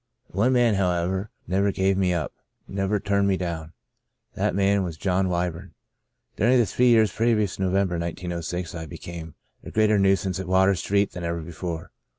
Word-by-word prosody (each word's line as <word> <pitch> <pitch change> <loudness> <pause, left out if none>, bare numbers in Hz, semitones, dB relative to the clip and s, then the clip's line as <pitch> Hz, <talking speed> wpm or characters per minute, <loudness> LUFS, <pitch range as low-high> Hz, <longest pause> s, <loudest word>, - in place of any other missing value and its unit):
One 110 +8 +2
man, 120 -3 +4
however, 95 +1 0 0.2
never 100 +2 +1
gave 95 0 +1
me 95 -1 +2
up 85 -3 -2 0.2
— - - -53
never 100 +1 -1
turned 100 0 +1
me 95 -1 +2
down. 85 -3 -4 0.6
That - - 0
man 100 0 +3
was 85 -4 -4
John 95 +2 +1
Wyburn. 90 +1 -3 0.6
During 120 +6 +3
the 120 - +4
three 125 +4 +2
years 110 -4 +5
previous 110 -3 +1
to - - -6
Novem 95 +1 +2
ber, 85 -2 -3
1906, 85 0 -4
I 80 -1 -6
became 80 0 -8 0.3
a - - -8
greater 110 -1 +3
nuisance 95 -1 +2
at 95 - -5
Water 95 +1 +4
Street 100 +2 0
than 90 - -7
ever 85 0 -2
before. 85 0 -6
95 Hz, 180 wpm, -25 LUFS, 85-100 Hz, 0.6 s, years